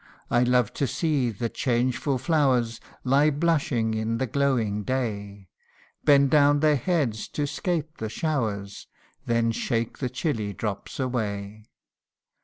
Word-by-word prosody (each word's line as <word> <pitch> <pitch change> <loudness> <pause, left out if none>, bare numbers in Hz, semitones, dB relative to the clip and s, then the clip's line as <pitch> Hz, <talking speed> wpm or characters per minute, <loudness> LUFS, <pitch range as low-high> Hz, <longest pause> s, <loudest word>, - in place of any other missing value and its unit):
I 120 - +4
love 125 -2 +2
to 140 - +3
see 145 -4 0
the 115 +2 -3
changeful 125 +3 0
flowers 130 -5 +1 0.2
Lie 140 +4 +4
blushing 145 -7 +1
in 110 +1 -1
the 130 - 0
glowing 120 -5 0
day 100 -5 -3 0.6
Bend 140 -2 +5
down 145 -1 +5
their 155 -1 +4
heads 135 - -1
to 145 - -2
'scape 160 +1 -3
the 110 - -4
showers, 110 -9 -3 0.4
Then 115 -1 +2
shake 115 0 -2
the 130 - -1
chilly 120 -6 -2
drops 105 +6 -5
away. 105 -5 -3
125 Hz, 130 wpm, -26 LUFS, 110-145 Hz, 0.6 s, Bend